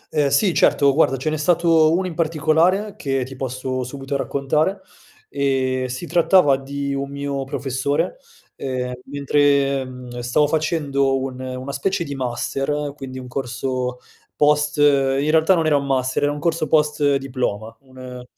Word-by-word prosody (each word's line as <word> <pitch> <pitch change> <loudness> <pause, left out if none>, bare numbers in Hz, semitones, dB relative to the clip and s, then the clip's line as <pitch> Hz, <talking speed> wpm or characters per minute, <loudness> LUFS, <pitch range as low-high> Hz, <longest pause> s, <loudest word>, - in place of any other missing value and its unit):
Ehm, 150 -1 +3
sì, 155 +7 +2
certo. 140 -3 +4
Guarda, 135 -2 +3
ce 135 +4 -2
n'è 155 - -1
stato 165 0 +3
1 185 +3 +1
in 180 - -4
particolare 165 +5 +1
che 135 -2 -2
ti 135 +1 -10
posso 130 0 -3
subito 135 +2 -5
raccontare: 150 +8 0 0.5
ehm, 130 -2 0
si 125 +7 -5
trattava 170 -4 +4
di 140 +1 -4
un 140 0 -3
mio 140 -1 -3
professore, 135 - -2 0.4
ehm, 125 -1 -3
mentre, 140 -1 +1
mhmm, 125 -1 -9
stavo 125 +5 +2
facendo 145 -4 0
un 130 -1 -5
una 130 +1 -5
specie 175 +7 -1
di 145 - -6
master, 135 +3 -2
quindi 135 -2 -8
un 125 -1 -8
corso 125 0 -3 0.4
post 150 0 +2
in 140 0 +3
realtà, 160 +4 +4
non 165 -2 0
era 150 -2 +3
un 140 - -2
master, 130 -1 0
era 145 - +2
un 145 - -5
corso 165 -1 0
post 150 -1 +2
diploma, 125 -5 -3
un 130 -1 -10
140 Hz, 155 wpm, -21 LUFS, 130-150 Hz, 0.5 s, certo